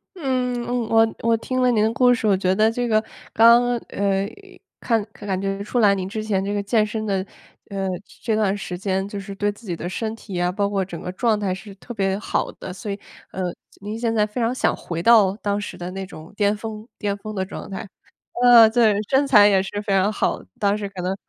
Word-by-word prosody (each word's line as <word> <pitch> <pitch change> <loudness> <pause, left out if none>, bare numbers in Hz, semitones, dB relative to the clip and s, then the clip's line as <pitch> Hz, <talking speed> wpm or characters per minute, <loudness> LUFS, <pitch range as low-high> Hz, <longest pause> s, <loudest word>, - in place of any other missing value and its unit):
嗯， 255 -6 -1
嗯， 245 -2 -1
我 225 0 +3
我 230 0 +3
听 255 +3 -3
了 250 -1 +4
您 215 -2 +2
的 220 - +2
故 245 +1 +4
事， 225 -2 -1
我 195 -2 +4
觉 185 0 +1
得 215 +3 +3
这 245 +1 -2
个 215 -1 +2 0.3
刚 235 +2 +7 0.3
呃， 195 0 0 0.5
看 225 -3 +1
感 195 -3 -4
觉 195 0 -2
出 240 +3 -1
来 200 -2 +5
您 185 -1 -3
之 215 +1 -4
前 195 -3 0
这 205 - -2
个 205 - 0
健 215 +1 +2
身 215 +1 -4
的， 190 -1 -1 0.5
呃， 195 -1 -2 0.3
这 220 -2 0
段 205 -2 +1
时 180 -3 -5
间 190 0 -1
就 205 - -5
是 200 0 -7
对 205 +1 0
自 215 +3 -16
己 175 -3 -3
的 175 +2 -5
身 220 +3 -3
体 195 -5 -6
啊， 175 0 +1
包 200 +1 0
括 195 -2 -1
整 170 -3 -8
个 180 - -5
状 220 +1 +1
态 190 -3 -1
是 195 +1 -9
特 240 +4 -10
别 195 -1 0
好 - - -2
的， 185 - -8
所 200 +2 -6
以， 200 - -5 0.3
呃， 190 - -5 0.4
您 210 +2 -5
现 230 -1 0
在 215 -2 +3
非 215 +4 -6
常 235 +1 +1
想 - - +1
回 170 -1 -5
到 205 -3 +5
当 205 -2 -1
时 205 - -6
的 175 +1 -5
那 190 0 -5
种 160 -3 -12
巅 205 0 +2
峰 215 +1 -7
巅 205 -1 -1
峰 215 +1 -7
的 190 -2 -1
状 - - -8
态。 195 +1 -6 0.6
呃 235 -2 +9
对， 220 -3 +3
身 275 +1 +3
材 210 -7 +7
也 195 -2 +3
是 205 +1 -4
非 200 -1 -1
常 195 +2 +3
好 - - 0
的， - - -16
当 205 0 +2
时 200 -1 -4
可 190 -2 -7
能 185 +2 -1
205 Hz, 260 characters per minute, -22 LUFS, 195-225 Hz, 0.6 s, 呃